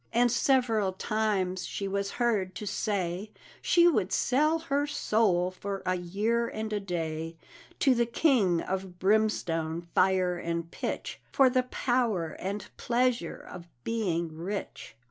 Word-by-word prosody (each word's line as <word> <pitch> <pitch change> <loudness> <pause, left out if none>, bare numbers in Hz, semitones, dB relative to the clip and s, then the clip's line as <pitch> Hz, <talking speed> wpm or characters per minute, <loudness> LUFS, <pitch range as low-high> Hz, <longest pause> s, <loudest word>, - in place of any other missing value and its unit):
And 240 0 +3
several 235 -6 +2
times 195 -3 -1
she 200 - -3
was 200 0 -2
heard 210 -7 +1
to 210 - -5
say 195 -1 -2 0.3
She 345 -1 +5
would 195 - +2
sell 305 +6 +2
her 290 -3 -1
soul 195 -9 +1
for 195 +1 -5
a 185 - +2
year 210 +7 0
and 215 -1 -4
a 210 - 0
day 165 -3 -4 0.4
To 270 - +5
the 235 -1 +1
King 230 - +3
of 190 -1 -4
Brimstone, 175 -5 +1
Fire, 185 -2 +3
and 170 0 -3
Pitch, - - -4
For 265 -2 +5
the 255 0 +3
power 230 -10 0
and 200 +1 -3
pleasure 240 -6 0
of 175 -1 -9 0.2
being 170 -8 -1
rich. 180 - -5
200 Hz, 140 wpm, -29 LUFS, 180-235 Hz, 0.4 s, She